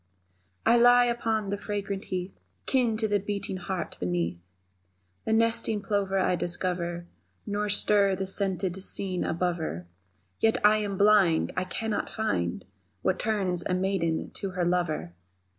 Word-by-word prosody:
I 235 - +5
lie 245 +1 +6
upon 225 -3 -1
the 200 - -2
fragrant 200 -1 -4
heath, 185 0 -4 0.3
Kin 245 -5 +2
to 220 0 +1
the 205 -1 +1
beating 200 -1 -3
heart 185 0 -4
beneath; 90 -1 -1 0.9
The 220 - +1
nesting 230 -1 +2
plover 200 -2 0
I 185 -1 +2
discover 175 0 -2 0.4
Nor 210 0 -2
stir 200 -1 +3
the 190 +1 -3
scented 190 -1 -1
screen 185 -1 0
above 175 +1 -1
her, 90 - -5 0.5
Yet 225 0 +3
am 210 -1 +3
I - - -3
blind 200 -5 +4
I 185 - -1
cannot 220 +3 -2
find 90 - -2 0.4
What 185 - +1
turns 195 -5 -1
a 180 - +2
maiden 185 -4 -1
to 195 - -5
her 180 -1 -1
lover! 170 - -1
195 Hz, 145 wpm, -27 LUFS, 180-210 Hz, 0.9 s, lie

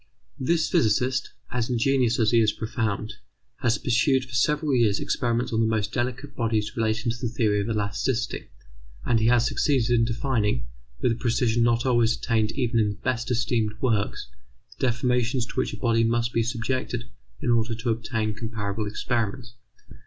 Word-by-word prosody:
This 160 +5 +1
physicist, 125 +4 +1 0.2
as 120 -1 -1
ingenious 125 -1 +2
as 110 -2 +2
he 120 - +5
is 105 -1 +3
profound, 110 -2 -3 0.4
has 115 -2 +1
pursued 130 +2 +2
for 130 - -14
several 150 +4 +1
years 115 -5 +3
experiments 120 -2 -1
on 110 - +1
the 115 - +3
most 110 -1 -1
delicate 130 +3 -3
points 110 -3 -1
relating 115 +1 0
to 120 - -5
the 120 - -1
theory 110 -3 +1
of 100 - -3
elasticity, 115 +3 -1 0.6
and 115 - +3
he 110 - +2
has 120 0 +4
succeeded 130 -2 +1
in 120 -1 +4
defining 115 - 0 0.4
with - - +2
a - - 0
precision 115 0 +1
not 120 +1 +2
always 120 -3 +3
attained 110 -3 0
even 120 -4 0
in 105 -2 +2
the 105 - -4
best 125 -2 -1
esteemed 115 -3 0
works, 110 - 0 0.5
the 130 - +2
deformations 125 0 +1
to - - -10
which - - -1
a - - -7
body 115 -2 +2
must 115 +1 +1
be 115 - +2
subjected 120 +1 -2 0.4
in 120 - 0
order 115 0 +1
to 115 +1 -1
obtain 110 -1 -2
comparable 110 -1 -4
experiments. 115 +2 -2
115 Hz, 175 wpm, -25 LUFS, 110-125 Hz, 0.6 s, he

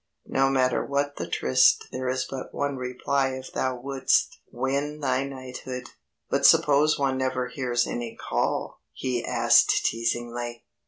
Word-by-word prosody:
No 135 0 +2
matter 130 -2 +2
what 145 0 -1
the - - -4
tryst 65 - +3
there 130 0 -3
is 130 0 -1
but 135 -1 -7
one 145 -1 -1
reply 130 +1 -1
if 130 0 -8
thou 130 -1 -1
wouldst 135 +1 +1
win 140 +3 -2
thy 130 -2 0
knighthood!_'" 130 -2 -7 0.4
"But - - 0
suppose 150 +1 +5
one 135 -2 0
never 130 -1 -1
hears 125 -2 0
any 120 -1 -5
call," - - -2
he 125 -2 -2
asked - - +4
teasingly. 120 +1 -2
130 Hz, 145 wpm, -26 LUFS, 125-140 Hz, 0.4 s, suppose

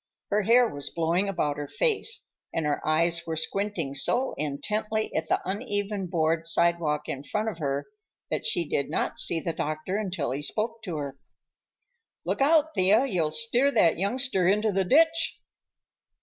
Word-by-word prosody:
Her 210 +1 +3
hair 235 +4 +5
was 145 -7 -4
blowing 170 +4 0
about 150 -6 -1
her 145 -1 -4
face, 455 - 0 0.3
and 165 - -2
her 145 -1 0
eyes 170 +2 +1
were 165 - -2
squinting 165 -2 -2
so 245 - +1
intently 210 +10 -2
at 160 0 -2
the - - 0
uneven 205 -1 -2
board 165 -1 0
sidewalk 165 -3 +2
in 135 - -5
front 210 +10 -2
of 185 -6 -8
her 140 -2 -2 0.5
that - - -1
she 170 -3 +1
did 140 - -1
not - - -1
see 165 - +1
the 165 +1 -3
doctor 155 +6 -3
until 185 - -2
he 135 +3 -3
spoke 225 +8 -2
to 175 -5 -4
her. 140 -2 -6 1.1
"Look - - -1
out, 315 +2 +4
Thea. 200 +6 +4
You'll 175 - 0
steer 230 - +3
that 170 -7 +3
youngster 200 -2 +1
into 210 +3 +2
the 195 -1 0
ditch." 325 - +3
185 Hz, 165 wpm, -27 LUFS, 155-215 Hz, 1.1 s, hair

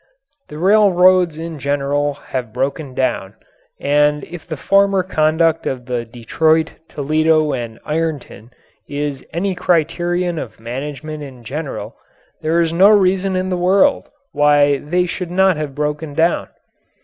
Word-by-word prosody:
The 150 - -8
railroads 185 -3 +4
in 165 -1 -6
general 145 +1 -1 0.2
have 125 -4 -3
broken 140 +2 -3
down, 120 -7 -1 0.4
and 150 0 +2
if 175 -2 -10
the 155 -3 -5
former 195 +2 +3
conduct 160 -1 +1
of 125 -2 -4
the 120 -1 -3
Detroit, 155 +8 +1 0.2
Toledo 155 +1 +1
& 110 -1 -15
Ironton 150 -8 -3 0.4
is 145 -1 -3
any 185 +4 -1
criterion 175 0 0
of 125 - -8
management 145 +6 -6
in 130 -4 -10
general 140 +5 -6 0.5
there 160 +2 +1
is 165 -1 0
no 190 +4 +6
reason 195 -2 +3
in 185 0 -1
the - - +1
world 195 +10 +2 0.2
why 145 -1 +3
they 180 +6 0
should 180 0 -5
not 190 +1 +3
have 150 -3 -5
broken 150 0 -3
down. 165 +2 +1
155 Hz, 135 wpm, -18 LUFS, 145-175 Hz, 0.5 s, no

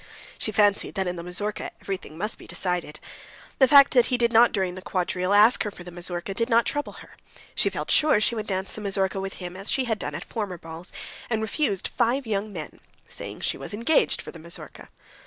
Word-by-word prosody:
She 215 - 0
fancied 205 -1 +2
that 190 -1 0
in 180 - -2
the 170 - -6
mazurka 190 +5 -3
everything 185 -5 -6
must 210 +5 -3
be - - -13
decided. 180 -4 -2 0.6
The 265 - +7
fact 280 +1 +8
that 245 -3 +5
he 250 - +1
did 235 -1 +2
not 235 +2 +7
during 190 -3 -1
the 185 - -8
quadrille 185 0 -1
ask 210 +4 +6
her 210 - 0
for 185 - -11
the 180 - -9
mazurka 175 +2 -3
did 230 +4 0
not 230 0 +4
trouble 290 0 -2
her. - - -13 0.4
She - - +2
felt - - -4
sure 300 -8 +5
she 215 - +2
would 215 -2 -4
dance 190 -1 -2
the 215 - -8
mazurka 195 -1 0
with 195 0 -4
him 180 -1 -7
as 195 +2 -3
she 265 - +1
had 220 -3 -1
done - - -4
at - - -6
former 205 -6 -4
balls, 165 +2 -8 0.4
and 220 -2 0
refused 220 - 0
five 255 +4 +1
young 210 -1 -2
men, 165 -6 -8 0.3
saying - - -6
she - - -1
was - - -5
engaged 235 +9 +2
for - - -8
the 165 - -11
mazurka. 170 +1 -7
200 Hz, 225 wpm, -25 LUFS, 180-230 Hz, 0.6 s, fact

